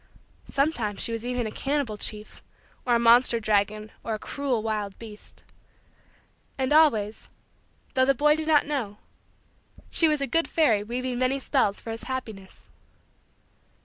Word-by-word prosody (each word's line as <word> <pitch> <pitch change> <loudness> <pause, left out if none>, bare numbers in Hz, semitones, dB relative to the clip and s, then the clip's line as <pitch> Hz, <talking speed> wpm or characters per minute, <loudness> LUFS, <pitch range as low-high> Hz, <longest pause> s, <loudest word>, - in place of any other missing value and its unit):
Sometimes 245 -8 -1
she - - -1
was 230 0 -3
even 250 -1 -1
a 215 - -4
cannibal 275 -5 -2
chief, 210 +1 -5 0.5
or 240 - +4
a - - +3
monster 235 0 +5
dragon, 215 0 0
or 225 - -2
a - - -4
cruel 255 -1 -2
wild 210 -3 -3
beast. 215 -2 -12 1.1
And 265 +1 0
always 225 -9 +3 0.6
though 260 0 +3
the 275 +1 +3
boy 300 +3 +4
did 315 0 -4
not 305 -2 +4
know 255 -9 -3 0.9
she 330 - +4
was 305 -1 +1
a 280 - 0
good 330 +4 0
fairy 240 -11 +2
weaving 245 +2 -3
many 255 +1 +1
spells 260 -6 0
for 225 - -7
his 225 0 -6
happiness. 220 -7 -7
240 Hz, 150 wpm, -26 LUFS, 215-275 Hz, 1.1 s, monster